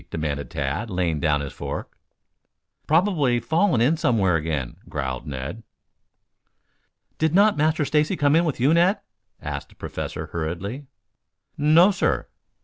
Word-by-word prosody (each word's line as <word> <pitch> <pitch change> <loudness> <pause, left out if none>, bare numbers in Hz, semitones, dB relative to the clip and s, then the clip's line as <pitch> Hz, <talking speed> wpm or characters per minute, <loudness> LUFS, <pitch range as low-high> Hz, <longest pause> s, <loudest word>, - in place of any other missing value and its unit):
demanded 75 -3 -3
Tad, 80 +7 -3
laying 90 -5 -1
down 75 -3 +1
his 70 - -6
fork. - - -6 0.9
"Probably 155 -7 +2
fallen 160 - +2
in 145 +7 +3
somewhere 115 - +2
again," 75 -6 -2
growled 65 -2 -4
Ned. 70 - -5 1.6
"Did 160 +1 +1
not 205 +2 +5
Master 155 0 +1
Stacy 150 +5 +1
come 145 0 +3
in 165 - +4
with 155 -7 -2
you, 135 +6 +4
Ned?" 180 +5 +3 0.4
asked 70 -1 -6
the - - -20
Professor - - -5
hurriedly. 90 - -5 0.7
"No, 160 +6 +5
sir." 190 - 0
120 Hz, 135 wpm, -23 LUFS, -, 1.6 s, not